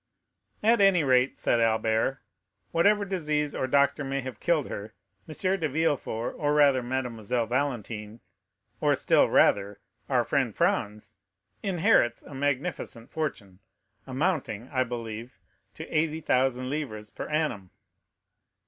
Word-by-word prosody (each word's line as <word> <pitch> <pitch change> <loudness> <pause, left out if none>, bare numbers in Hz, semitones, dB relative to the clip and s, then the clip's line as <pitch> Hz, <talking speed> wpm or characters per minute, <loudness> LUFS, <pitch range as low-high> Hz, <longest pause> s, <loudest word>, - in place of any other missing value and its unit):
"At 230 0 +4
any 195 -4 +5
rate," 130 -1 +3
said 120 - +1
Albert, 110 +3 +1 0.5
"whatever 200 +5 +3
disease 150 -6 -1
or 130 - -2
doctor 140 +2 +2
may 135 0 -2
have 130 -4 -7
killed 160 -5 +1
her, 105 +2 -7 0.3
M. 185 +5 0
de 155 -2 -1
Villefort, 140 -6 -1
or 150 -1 +1
rather, 140 -3 +5
Mademoiselle 120 -2 -2
Valentine,—or, 115 -4 -3
still - - +3
rather, 100 0 +3 0.3
our - - +3
friend - - 0
Franz, 105 +1 -1 0.5
inherits 180 - +2
a - - -12
magnificent 140 -3 -3
fortune, 105 -12 -4 0.5
amounting, 130 - -2
I 130 -1 +1
believe, 115 0 -7 0.4
to - - -8
80,000 135 -5 +1
livres 125 -8 -4
per - - -6
annum." 150 - -1
130 Hz, 120 wpm, -27 LUFS, 115-155 Hz, 0.5 s, any